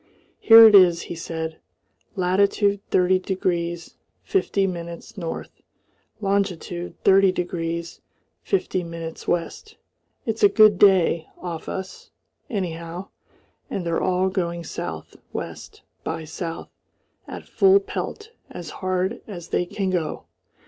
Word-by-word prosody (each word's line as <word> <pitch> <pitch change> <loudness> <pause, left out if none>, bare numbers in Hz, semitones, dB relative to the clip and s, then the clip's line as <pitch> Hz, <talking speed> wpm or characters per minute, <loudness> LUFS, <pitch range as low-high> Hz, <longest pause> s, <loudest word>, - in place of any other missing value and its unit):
"Here 225 0 +9
it 215 - +5
is," 180 -4 +6
he - - -7
said, 160 -1 -5 0.6
"latitude 200 +2 +2
30 185 0 +3
degrees 175 -3 -3 0.3
50 205 - +1
minutes 170 +3 -6
N. 170 -5 -5 0.7
longitude 195 -3 -2
30 195 -1 +5
degrees 170 -2 -4 0.4
50 275 - -1
minutes 165 -1 -7
W. 170 -1 +1 0.8
It's 225 -1 -3
a 205 - +7
good 210 -1 +5
day 180 -5 +4
off 170 -3 -6
us, 190 0 -7 0.4
anyhow, 175 -4 -4 0.6
and 180 - -4
they're 170 -1 0
all 185 0 +1
going 170 -3 -2
south - - -7 0.2
west - - -7 0.2
by 160 0 -4
south 165 +1 -6 0.6
at - - -8
full 390 0 +5
pelt 420 +2 -6 0.2
as 170 -3 -8
hard 185 +4 -1
as 175 -5 -8
they 180 - 0
can 190 0 -2
go. 165 -4 -2
180 Hz, 120 wpm, -23 LUFS, 170-200 Hz, 0.8 s, Here